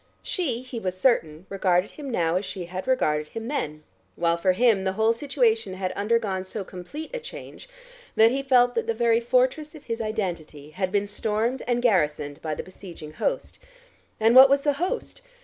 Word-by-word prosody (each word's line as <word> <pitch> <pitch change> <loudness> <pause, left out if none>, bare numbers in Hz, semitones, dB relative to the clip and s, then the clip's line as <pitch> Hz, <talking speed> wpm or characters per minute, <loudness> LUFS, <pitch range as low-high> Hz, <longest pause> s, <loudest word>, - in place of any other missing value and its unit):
She, 255 - -2
he 255 -2 -6
was 185 -3 -3
certain, 170 -8 +1
regarded 190 -1 +1
him 290 -3 -8
now 170 -8 0
as 185 - -2
she 185 -2 -6
had 185 +4 -6
regarded 150 -12 +1
him 225 0 -6
then, 155 - -3 0.3
while 170 0 +1
for 185 +2 +2
him 220 -1 +3
the 190 0 0
whole 220 +3 +3
situation 230 -6 0
had 185 -1 -2
undergone 205 -3 0
so 195 +2 -6
complete 195 - -8
a - - -2
change, 480 +1 -10 0.5
that 225 +1 +6
he 270 +2 -1
felt 250 -2 +4
that 230 - -2
the 230 - 0
very 230 0 +3
fortress 255 +6 +1
of 300 - -12
his 230 0 -4
identity 175 -9 -4
had 185 +2 -2
been 205 0 +1
stormed 220 +4 -1
and 245 0 0
garrisoned 150 -9 +1
by 155 -1 -3
the - - -5
besieging 175 -5 -11
host. - - -3 0.6
And 225 +2 +4
what 265 +1 +10
was 280 0 +3
the 290 - +2
host? 430 +8 -3
220 Hz, 190 wpm, -25 LUFS, 185-250 Hz, 0.6 s, what